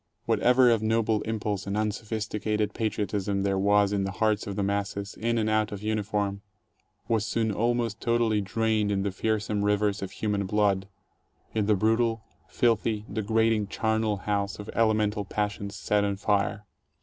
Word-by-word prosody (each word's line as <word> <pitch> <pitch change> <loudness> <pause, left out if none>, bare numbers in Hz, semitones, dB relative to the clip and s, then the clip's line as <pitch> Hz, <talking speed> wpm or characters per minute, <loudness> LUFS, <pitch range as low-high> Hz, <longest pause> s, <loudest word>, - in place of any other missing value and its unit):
Whatever 125 0 +4
of 115 -2 +2
noble 110 -1 +1
impulse 105 -3 -2
and 100 +1 -1
unsophisticated 105 0 -2
patriot 105 -3 -2
ism 100 -1 -1
there 95 -1 +1
was 100 0 +3
in 100 -1 +1
the 100 0 -3
hearts 110 -1 0
of 100 - -4
the 100 - -1
masses, 100 0 -2
in 115 +1 -1
and 110 -1 +1
out 110 0 +1
of 105 0 -6
uniform, 105 -2 -1 0.7
was 110 -3 +1
soon 110 0 0
almost 115 0 0
totally 115 -3 +2
drained 110 0 0
in 95 -1 0
the 100 - -1
fearsome 105 +1 -1
rivers 105 0 +1
of 95 - -4
human 100 -1 -2
blood, 100 -1 +1 0.7
in 105 -2 0
the 105 - +4
brutal, 115 +2 +1 0.2
filthy, 115 -2 +1
degrading 110 0 +1
charnel 110 0 0
house 100 0 -2
of 105 - -7
elemental 110 -2 +2
passions 100 0 -3
set 105 0 +1
on 100 -1 0
fire. 100 +1 0
105 Hz, 160 wpm, -27 LUFS, 100-110 Hz, 0.7 s, Whatever